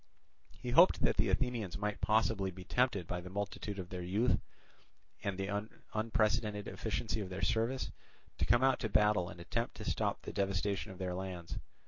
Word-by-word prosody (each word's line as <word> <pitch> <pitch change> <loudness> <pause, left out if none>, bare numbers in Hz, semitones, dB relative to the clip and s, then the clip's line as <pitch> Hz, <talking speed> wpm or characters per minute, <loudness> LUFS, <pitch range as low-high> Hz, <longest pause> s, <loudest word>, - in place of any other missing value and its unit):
He 125 - -4
hoped 170 +9 +7
that - - +3
the - - +3
Athenians 120 -9 0
might 105 0 -2
possibly 110 -3 +2
be 95 0 -9
tempted 120 -5 +1
by 90 +1 -3
the 90 - -8
multitude 100 +1 -3
of 90 -2 -5
their 90 -1 -4
youth 105 +8 +2 0.8
and 100 -2 -1
the 100 +2 -2 0.2
unprecedented 110 -1 +1
efficiency 110 0 -2
of 95 - -5
their 90 - -5
service 115 +4 +1 0.5
to - - +2
come 120 +2 +4
out 135 -1 +4
to 110 - -2
battle 105 -4 +3
and 90 -2 -10
attempt 115 +7 -2
to - - -7
stop - - 0
the - - -6
devastation 100 +1 0
of 95 - -10
their 90 -1 -2
lands. 90 -2 -5
105 Hz, 180 wpm, -34 LUFS, 95-110 Hz, 0.8 s, hoped